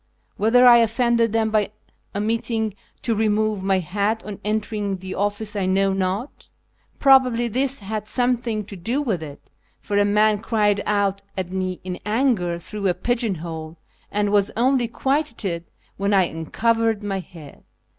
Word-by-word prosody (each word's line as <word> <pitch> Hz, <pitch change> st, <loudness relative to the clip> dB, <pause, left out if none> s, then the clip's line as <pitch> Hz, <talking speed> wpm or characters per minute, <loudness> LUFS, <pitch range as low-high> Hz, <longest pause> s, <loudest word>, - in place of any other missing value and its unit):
Whether 235 Hz, +5 st, +4 dB
I 240 Hz, -1 st, +9 dB
offended 235 Hz, 0 st, +2 dB
them 220 Hz, -1 st, +1 dB
by 215 Hz, -2 st, +2 dB, 0.5 s
omitting 220 Hz, +1 st, -1 dB, 0.3 s
to 230 Hz, -, +1 dB
remove 215 Hz, -1 st, +1 dB
my 190 Hz, 0 st, +2 dB
hat 200 Hz, +5 st, -1 dB
on 210 Hz, -1 st, -7 dB
entering 210 Hz, -1 st, -2 dB
the 185 Hz, 0 st, -7 dB
office 205 Hz, +1 st, -2 dB
I 195 Hz, -2 st, 0 dB
know 195 Hz, +1 st, +2 dB
not; 190 Hz, +7 st, -3 dB, 0.5 s
probably 255 Hz, -3 st, +5 dB
this 265 Hz, +4 st, 0 dB
had 210 Hz, +1 st, -4 dB
something 240 Hz, -3 st, 0 dB
to 200 Hz, -, -9 dB
do 225 Hz, +10 st, -2 dB
with 220 Hz, -, -1 dB
it, 145 Hz, -2 st, -10 dB, 0.3 s
for 205 Hz, -1 st, -1 dB
a -, -, +5 dB
man 210 Hz, +1 st, +3 dB
cried 210 Hz, -2 st, +1 dB
out 200 Hz, -1 st, +1 dB, 0.2 s
at 185 Hz, -1 st, -3 dB
me 185 Hz, -1 st, -2 dB
in 180 Hz, -1 st, -5 dB
anger 210 Hz, -6 st, +1 dB
through 200 Hz, +3 st, -4 dB
a 180 Hz, -, +1 dB
pigeon 230 Hz, +1 st, -1 dB
hole, 160 Hz, -1 st, -7 dB, 0.3 s
and 205 Hz, 0 st, 0 dB
was 200 Hz, -1 st, +3 dB
only 250 Hz, 0 st, +2 dB
quieted 230 Hz, -, -1 dB, 0.3 s
when 200 Hz, +1 st, +1 dB
I 190 Hz, -, +5 dB
uncovered 220 Hz, +7 st, 0 dB
my 195 Hz, -2 st, -2 dB
head. 165 Hz, -6 st, -12 dB
210 Hz, 155 wpm, -22 LUFS, 190-230 Hz, 0.5 s, I